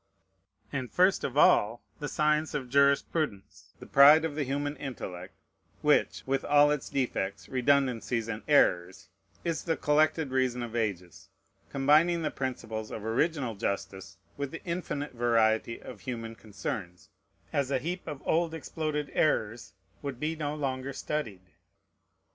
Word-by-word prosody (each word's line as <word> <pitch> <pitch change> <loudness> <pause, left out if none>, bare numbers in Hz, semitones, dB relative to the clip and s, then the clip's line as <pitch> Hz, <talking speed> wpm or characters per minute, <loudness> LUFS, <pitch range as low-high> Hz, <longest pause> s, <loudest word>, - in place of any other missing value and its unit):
And 130 -3 -3
first 185 +1 +3
of 135 - -3
all, 115 -5 +4 0.2
the 145 - -3
science 150 0 +1
of 130 -4 -4
jurisprudence, 140 - 0
the - - -10
pride 150 +3 +7
of 160 - -3
the 150 - -3
human 145 +2 -2
intellect, 95 -8 -7 0.5
which, - - +2
with 135 0 0
all 145 0 +5
its 150 -2 -2
defects, 115 -7 -2
redundancies, 125 -3 +1
and 110 -1 -4
errors, 95 -11 +2 0.3
is 165 -2 -2
the 165 -3 0
collected 155 0 +2
reason 130 -2 0
of 120 -1 -7
ages, 95 -7 -3 0.4
combining 155 +5 +3
the - - -1
principles 110 -5 -4
of 110 - -7
original 130 +2 0
justice 95 -1 -4 0.2
with 140 -1 -3
the 165 - -9
infinite 170 -5 -4
variety 115 -1 +1
of 105 -6 -11
human 115 -3 -5
concerns, 100 -4 -6 0.4
as 140 -2 0
a 135 - +1
heap 175 +8 -5
of 145 -2 -6
old 165 0 +1
exploded 155 -2 -3
errors, 115 -6 0 0.3
would 140 -4 -5
be 155 +3 -1
no 150 -1 -3
longer 135 -2 -3
studied. 130 -11 -4
135 Hz, 140 wpm, -29 LUFS, 115-150 Hz, 0.5 s, pride